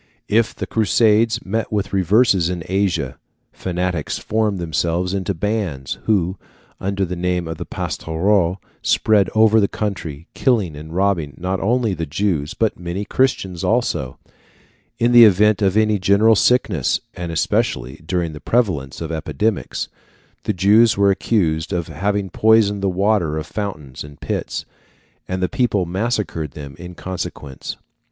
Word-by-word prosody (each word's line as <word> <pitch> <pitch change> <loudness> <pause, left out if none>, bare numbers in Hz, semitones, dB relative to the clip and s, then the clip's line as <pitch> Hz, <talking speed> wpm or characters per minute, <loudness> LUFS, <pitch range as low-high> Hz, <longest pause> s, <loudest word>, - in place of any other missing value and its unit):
If 115 +1 +2
the - - -4
Crusaders 110 +1 +2
met 110 +3 -2
with 105 -2 -2
reverses 95 -1 +3
in 90 -2 -3
Asia, 95 -9 -1 0.3
fanatics 90 -3 -2
formed 110 -2 0
themselves 85 +2 -1
into 100 0 -2
bands, 90 -8 -2
who, 95 -4 +1 0.4
under 100 0 -1
the 90 0 -4
name 90 -1 -1
of 80 -1 -5
Pastoureaux, 90 +2 0 0.2
spread 105 -4 +3
over 110 0 +5
the 100 - +3
country, 85 -9 -4
killing 105 - +1
and 75 +2 -9
robbing 90 -8 0
not 95 +2 -2
only 115 0 +1
the 80 -2 -4
Jews, 80 -2 -1
but 110 -2 0
many 90 +3 -4
Christians 95 -9 0
also. 65 -1 0 0.8
In 120 +1 +2
the 120 -1 +9
event 105 0 +5
of 100 0 +2
any 110 -1 +3
general 100 +4 +4
sickness, 105 - +2
and 85 -1 -5
especially 65 -5 -1
during 85 -1 -2
the 75 - -9
prevalence 85 - 0
of 80 -1 -4
epidemics, 100 +7 -2 0.6
the 105 - 0
Jews 105 +5 +4
were 100 0 +4
accused 85 -5 0
of 85 -4 -2
having 95 +4 -2
poisoned 105 -1 +3
the 100 - +1
water 95 -4 +1
of 80 - -3
fountains 90 -10 -5
and 75 0 -13
pits, - - -3 0.6
and 95 0 -2
the - - +3
people 115 -7 0
massacred 95 - -2
them 70 -2 -9
in 90 +1 -9
consequence. 85 -7 -6
95 Hz, 145 wpm, -20 LUFS, 85-105 Hz, 0.8 s, the